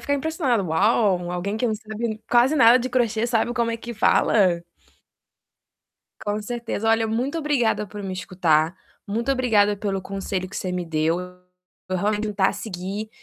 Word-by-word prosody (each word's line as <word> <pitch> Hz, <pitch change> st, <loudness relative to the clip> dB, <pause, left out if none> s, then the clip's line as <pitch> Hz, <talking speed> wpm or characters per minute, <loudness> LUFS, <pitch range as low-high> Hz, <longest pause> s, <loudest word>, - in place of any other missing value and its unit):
ficar 285 Hz, -, -1 dB
impressionada: 280 Hz, -, 0 dB
"Uau, 185 Hz, 0 st, +2 dB
alguém 190 Hz, +4 st, -3 dB
que 245 Hz, -, 0 dB
não 220 Hz, -, 0 dB
sabe 220 Hz, +2 st, -5 dB
ni 215 Hz, 0 st, -4 dB
quase 245 Hz, +5 st, +4 dB
nada 240 Hz, 0 st, +7 dB
de 255 Hz, +1 st, -3 dB
crochê 235 Hz, -2 st, +1 dB
sabe 240 Hz, 0 st, 0 dB
como 235 Hz, -1 st, 0 dB
é 230 Hz, -, -2 dB
que 235 Hz, +1 st, -8 dB
fala?" 185 Hz, -5 st, +3 dB, 1.6 s
Com 205 Hz, +1 st, -1 dB
certeza. 230 Hz, -1 st, -3 dB
Olha, 225 Hz, 0 st, +3 dB
muito 250 Hz, +8 st, -1 dB
obrigada 245 Hz, -9 st, +1 dB
por 205 Hz, +1 st, -8 dB
me 190 Hz, -1 st, -4 dB
escutar. 175 Hz, -3 st, +1 dB, 0.3 s
Muito 230 Hz, +6 st, -2 dB
obrigada 215 Hz, -6 st, +3 dB
pelo 195 Hz, -1 st, -2 dB
conselho 190 Hz, -1 st, -4 dB
que -, -, -8 dB
você 185 Hz, -, -3 dB
me 180 Hz, -1 st, -2 dB
deu. 160 Hz, +1 st, 0 dB, 0.7 s
Eu 185 Hz, -, -1 dB
realmente 210 Hz, +3 st, 0 dB
vou 210 Hz, -, -4 dB
tentar 195 Hz, -1 st, +2 dB
seguir 200 Hz, +1 st, -5 dB
215 Hz, 170 wpm, -23 LUFS, 190-235 Hz, 1.6 s, nada